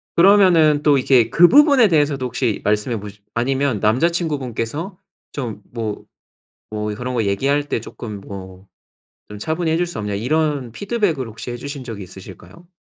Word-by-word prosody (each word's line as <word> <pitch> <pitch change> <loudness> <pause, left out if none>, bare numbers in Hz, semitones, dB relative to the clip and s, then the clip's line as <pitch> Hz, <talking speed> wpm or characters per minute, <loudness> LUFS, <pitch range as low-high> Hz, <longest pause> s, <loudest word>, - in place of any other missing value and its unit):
그러면은 170 -6 +5
또 145 -2 +4
이게 125 -3 +3
그 175 +1 +6
부분에 280 - +6
대해서도 145 -5 +1
혹시 120 -3 -2
말씀해 105 +2 0
보시 105 0 -10
아니면 130 -1 0
남자 120 - +2
친구분께서 155 - -3 0.3
좀 115 -7 -5
뭐 110 -3 -4 0.7
뭐 105 0 -3
"그런 125 +2 -4
거 115 - +1
얘기할 140 +9 0
때 115 - -1
조금 105 -2 -8
뭐 95 -1 -10 0.6
좀 105 0 -10
차분히 160 +6 -1
해줄 170 +2 +1
수 175 - -7
없냐?" 105 -1 -3
이런 140 +3 -1
피드백을 195 - -1
혹시 115 +2 -8
해 120 - -5
주신 140 +2 -7
적이 110 -5 -7
있으실까요? 95 - -13
130 Hz, 335 characters per minute, -20 LUFS, 110-160 Hz, 0.7 s, 그